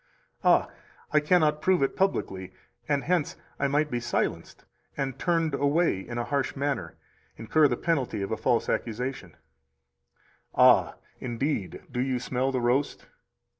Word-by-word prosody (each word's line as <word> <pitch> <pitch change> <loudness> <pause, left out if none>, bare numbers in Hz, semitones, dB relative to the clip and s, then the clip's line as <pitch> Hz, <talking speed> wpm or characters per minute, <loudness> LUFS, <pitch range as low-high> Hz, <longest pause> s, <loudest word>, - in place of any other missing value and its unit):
Ah, - - +4 0.4
I 155 - +5
cannot 150 -1 +2
prove 180 -2 +3
it 135 - 0
publicly, 95 - -1 0.4
and 145 -2 +1
hence 175 -4 0 0.2
I 140 - +2
might 145 +2 +1
be 120 - 0
silenced 120 +1 -3 0.3
and 135 -2 -3
turned 165 -4 +1
away 145 - +2
in 120 +5 -7
a 120 - 0
harsh 140 +1 -1
manner 135 - -2 0.4
[incur 150 +7 +3
the 120 -3 -1
penalty 130 -11 -1
of 100 - -4
a - - +1
false 115 +2 +1
accusation]. 120 -6 -3 1.2
"Ah, - - +5 0.2
indeed, 120 -4 -3
do 125 - -3
you 130 -1 0
smell 130 +2 -1
the 130 -2 -1
roast?" 125 +4 0
135 Hz, 145 wpm, -27 LUFS, 120-150 Hz, 1.2 s, I